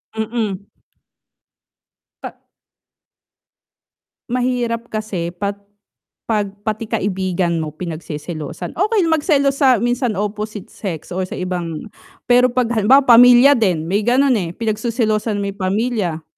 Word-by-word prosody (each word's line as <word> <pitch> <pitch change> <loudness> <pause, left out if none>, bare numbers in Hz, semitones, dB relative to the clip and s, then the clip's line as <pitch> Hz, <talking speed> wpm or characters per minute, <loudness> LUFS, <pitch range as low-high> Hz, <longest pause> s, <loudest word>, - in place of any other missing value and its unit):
Mm. 220 -3 -3 1.6
Pa - - -6 2.0
Mahirap 245 -2 -1
kasi 185 -6 -4
pat 200 +2 -3 0.6
'pag 210 -3 0 0.2
pati 215 0 -3
kaibigan 185 -5 -1
mo 155 -1 -5
pinagseselosan, 160 -1 -6
okey 420 0 +2
magselos 285 -3 +2
sa 265 -3 +5
minsan 240 -2 0
opposite 210 0 -4
sex 175 -7 -6
or 185 +1 -2
sa - - -7
ibang 180 +1 -4 0.3
pero 245 +1 +4
'pag 245 -1 -1
halimbawa 240 +5 +4
pamilya 245 +2 +7
din, 180 -7 +1
may 200 - +2
ganun, 265 +2 +3
eh, 175 -2 -5
pinagseselosan 215 -2 -1
mo 200 - -2
yung 200 - -17
pamilya 190 -4 -1
215 Hz, 115 wpm, -19 LUFS, 185-245 Hz, 2.0 s, pamilya